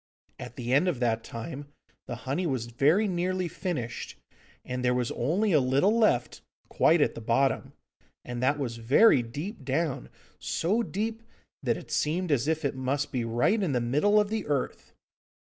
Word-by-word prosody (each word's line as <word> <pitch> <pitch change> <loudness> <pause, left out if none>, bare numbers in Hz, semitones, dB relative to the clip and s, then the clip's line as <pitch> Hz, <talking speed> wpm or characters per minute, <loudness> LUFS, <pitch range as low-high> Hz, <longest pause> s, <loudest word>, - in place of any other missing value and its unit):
At 125 0 -8
the 125 0 -3
end 145 +7 +4
of 165 -9 0
that 115 -2 0
time 140 +5 -7 0.4
the 120 - -4
honey 165 +7 -1
was 130 -5 -1
very 145 - +2
nearly 185 0 -1
finished, 150 - -5 0.5
and 125 0 -4
there 125 0 +2
was 125 -1 -1
only 185 - 0
a 155 - +5
little 140 - +2
left, 215 - +1 0.3
quite 165 0 +3
at - - +2
the 115 - -8
bottom, 120 +5 +1 0.5
and 120 0 -5
that 140 +3 +2
was 120 -5 -3
very 130 - +5
deep 145 - -6
down, 140 +2 -2 0.3
so 170 - 0
deep 225 +1 -3 0.4
that - - 0
it - - -11
seemed 170 +3 0
as 140 -1 +1
if 160 -1 0
it 140 - 0
must 130 +2 -2
be 125 -3 -1
right 120 - +1
in 175 -8 0
the 125 - +2
middle 150 - +3
of 210 -1 +1
the 220 -2 -2
earth. 145 -3 -2
140 Hz, 175 wpm, -28 LUFS, 125-180 Hz, 0.5 s, a